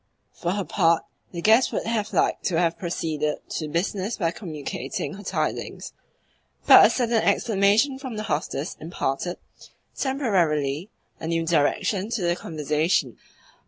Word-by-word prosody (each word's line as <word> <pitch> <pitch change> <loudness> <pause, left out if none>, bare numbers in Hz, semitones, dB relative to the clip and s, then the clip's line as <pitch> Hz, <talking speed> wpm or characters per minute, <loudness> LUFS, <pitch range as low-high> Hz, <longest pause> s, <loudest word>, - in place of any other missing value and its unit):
'" - - -46
For 175 0 0
her 200 0 -1
part, 165 -1 +2 0.3
the 170 -1 -6
guest 225 +4 +5
would - - -2
have 220 -2 -1
liked - - +1
to 170 - +1
have 170 -1 +2
proceeded 155 -4 -2
to 155 - -3
business 190 +6 -2
by 165 -4 0
communicating 150 - -5
her 200 - -9
tidings, 200 - -3 0.7
but - - +9
a - - -1
sudden 235 -3 +1
exclamation 225 +5 +2
from 260 -4 -6
the 215 - -3
hostess 150 -3 -3
imparted 165 +1 -3 0.6
(temporarily) 180 - 0 0.3
a 160 - -5
new 165 0 0
direction 185 +6 +1
to 230 -5 -2
the 175 0 +2
conversation. 155 0 -1
175 Hz, 145 wpm, -24 LUFS, 160-215 Hz, 0.7 s, but